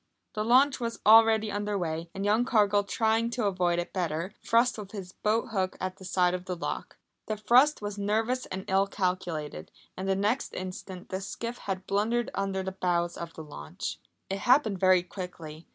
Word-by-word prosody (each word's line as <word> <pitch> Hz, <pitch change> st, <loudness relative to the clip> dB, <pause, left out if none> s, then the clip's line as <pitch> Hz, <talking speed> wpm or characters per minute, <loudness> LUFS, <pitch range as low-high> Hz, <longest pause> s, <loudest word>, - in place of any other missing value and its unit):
The 215 Hz, -, -1 dB
launch 260 Hz, +5 st, +4 dB
was 230 Hz, -1 st, -3 dB
already 220 Hz, -1 st, +6 dB
under 205 Hz, 0 st, -2 dB
way, 165 Hz, -2 st, -3 dB
and 195 Hz, +1 st, -3 dB
young 215 Hz, +3 st, +3 dB
Cargill 205 Hz, -4 st, +3 dB
trying 225 Hz, +3 st, +1 dB
to 235 Hz, -2 st, -2 dB
avoid 180 Hz, -3 st, +1 dB
it 175 Hz, -, -3 dB
better, 175 Hz, +1 st, -2 dB
thrust 235 Hz, 0 st, +3 dB
with 200 Hz, -1 st, -9 dB
his 190 Hz, -3 st, -7 dB
boat 215 Hz, +5 st, 0 dB
hook 190 Hz, -4 st, -1 dB
at 185 Hz, +1 st, -4 dB
the 190 Hz, -, -11 dB
side 180 Hz, -1 st, +2 dB
of 180 Hz, 0 st, -4 dB
the 185 Hz, -, -3 dB
lock. 170 Hz, -, -5 dB, 0.3 s
The 215 Hz, -, -2 dB
thrust 245 Hz, +5 st, +4 dB
was 205 Hz, 0 st, -4 dB
nervous 225 Hz, +5 st, 0 dB
and 190 Hz, 0 st, -5 dB
ill 195 Hz, +1 st, +3 dB
calculated, 175 Hz, -, -3 dB, 0.3 s
and 190 Hz, +1 st, -4 dB
the 190 Hz, -, +3 dB
next 210 Hz, +7 st, -1 dB
instant 185 Hz, 0 st, -7 dB
the 190 Hz, +1 st, -3 dB
skiff 235 Hz, +4 st, -5 dB
had 190 Hz, -1 st, -4 dB
blundered 230 Hz, +4 st, 0 dB
under 195 Hz, -1 st, -1 dB
the 190 Hz, -, -3 dB
bows 175 Hz, -2 st, 0 dB
of 170 Hz, -1 st, -7 dB
the 160 Hz, -, -7 dB
launch. 75 Hz, -, -6 dB, 0.3 s
It 195 Hz, +1 st, -3 dB
happened 245 Hz, -6 st, +3 dB
very 185 Hz, -1 st, +5 dB
quickly. 170 Hz, -4 st, -8 dB
195 Hz, 190 wpm, -28 LUFS, 180-220 Hz, 0.3 s, already